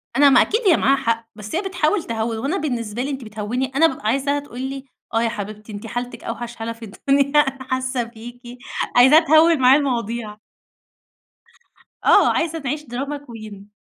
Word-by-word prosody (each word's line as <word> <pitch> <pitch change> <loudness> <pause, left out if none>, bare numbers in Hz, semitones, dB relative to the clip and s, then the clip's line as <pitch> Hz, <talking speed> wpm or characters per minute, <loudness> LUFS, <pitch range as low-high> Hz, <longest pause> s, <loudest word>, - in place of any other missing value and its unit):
أنا 285 +2 +6
ما 270 - +6
أكيد 440 +3 +1
هي 335 - +6
معاها 275 +1 +3
حق، 230 -3 -1
بس 210 +5 -7
هي 345 - +1
بتحاول 380 -2 0
تهوِّن، 225 0 -3
وأنا 280 - -1
بالنسبة 240 - -3
لي 275 - -2
أنتِ 265 -3 -5
بتهوِّني، 220 +5 -3
أنا 325 +4 +6
بابقى 310 - -7
عايزاها 275 +4 +1
تقول 255 -3 -9
لي: 270 +1 -5 0.3
"آه 225 - +2
يا 230 - +1
حبيبتي 210 0 -7
أنتِ 205 +2 -7
حالتِك 245 +1 -5
أوحش 240 +1 -6
حالة 225 0 -5
في 230 0 -11
الدنيا، 280 +7 +1
أنا 270 -2 0
حاسّة 260 -1 -2
بيكِ"، 235 +1 -11 0.5
عايزاها 265 +6 +8
تهوِّل 320 -1 +4
معايا 260 +3 +6
المواضيع. 235 -5 -3 1.7
آه، - - +5
عايزة 325 -1 -1
تعيش 295 +2 -3
دراما 275 +3 -4
كوين. 215 -7 -11
255 Hz, 180 wpm, -21 LUFS, 230-285 Hz, 1.7 s, عايزاها